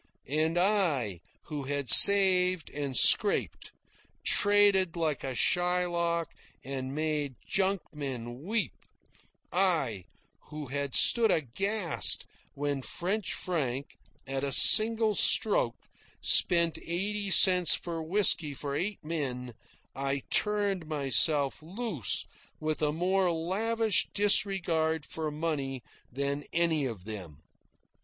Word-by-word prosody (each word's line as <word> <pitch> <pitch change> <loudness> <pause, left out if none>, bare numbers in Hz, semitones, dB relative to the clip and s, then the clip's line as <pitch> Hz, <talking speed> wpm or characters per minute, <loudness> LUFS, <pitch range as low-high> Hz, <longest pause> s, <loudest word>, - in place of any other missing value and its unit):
And 160 +2 -1
I, 165 - 0 0.2
who 145 -3 -7
had 140 -1 -2
saved 185 -4 +7
and 140 -3 -5
scraped, - - +2 0.5
traded 205 -4 +2
like 155 -5 -3
a 130 -2 -5
Shylock 175 0 -1 0.3
and 130 0 -6
made 150 -3 -3
junkmen 145 - -4
weep; 215 0 -3 0.8
I, 160 - 0 0.4
who 150 -3 -9
had 140 0 -5
stood 230 -2 +2
aghast 185 - +1 0.3
when 145 -1 -4
French 190 +8 -4
Frank, 140 -7 -5 0.3
at 135 0 -5
a 140 - -3
single 220 - +6
stroke, - - +2 0.3
spent 170 -2 +3
eighty 200 +4 -3
cents 180 -2 +5
for 165 -2 -6
whisky 160 -4 +1
for 140 0 -6
eight 190 +1 -5
men, 130 -6 -5 0.4
I 135 0 -4
turned 205 -5 -1
myself 145 -1 +1
loose 185 - -3 0.3
with 155 0 -4
a 150 -1 0
more 180 +3 -1
lavish 210 +6 -1
disregard 175 -6 0
for 160 -1 -6
money 145 -5 -5 0.3
than 140 +3 -4
any 165 -4 -1
of 110 -7 -9
them. 90 -8 -10
160 Hz, 105 wpm, -27 LUFS, 140-190 Hz, 0.8 s, saved